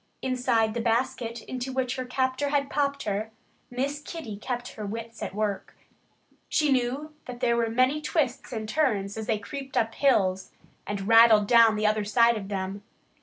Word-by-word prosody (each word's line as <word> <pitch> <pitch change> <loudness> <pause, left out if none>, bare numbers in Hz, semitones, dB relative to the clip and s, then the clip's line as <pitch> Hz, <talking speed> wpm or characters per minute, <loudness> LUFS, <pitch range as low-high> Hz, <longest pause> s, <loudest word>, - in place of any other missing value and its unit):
Inside 245 -4 +1
the 235 - -2
basket 230 0 -1
into 255 +1 -5
which 260 -1 -1
her 255 - -4
captor 260 +2 -1
had 280 -1 0
popped 280 -1 0
her, 210 +2 -2 0.4
Miss 275 +4 -3
Kitty 295 -9 -7
kept 245 +3 -4
her 215 - -8
wits 230 +2 -6
at - - -5
work. 210 -2 -3 0.7
She 300 -2 +2
knew 265 +4 -1
that 245 -1 -8
there 240 -2 +2
were 230 -1 +1
many 255 +6 +2
twists 280 -4 -1
and 220 -2 -4
turns 215 -7 0
as 220 -1 -5
they 220 - +1
creaked 270 +6 -7
up 225 0 +2
the - - -16
hills 190 -9 +2 0.4
and 200 -1 -4
rattled 225 -2 +7
down 230 0 +6
the 215 0 -1
other 215 0 +2
side 230 +3 +4
of 200 -3 -5
them. 195 0 -4
235 Hz, 180 wpm, -27 LUFS, 215-260 Hz, 0.7 s, rattled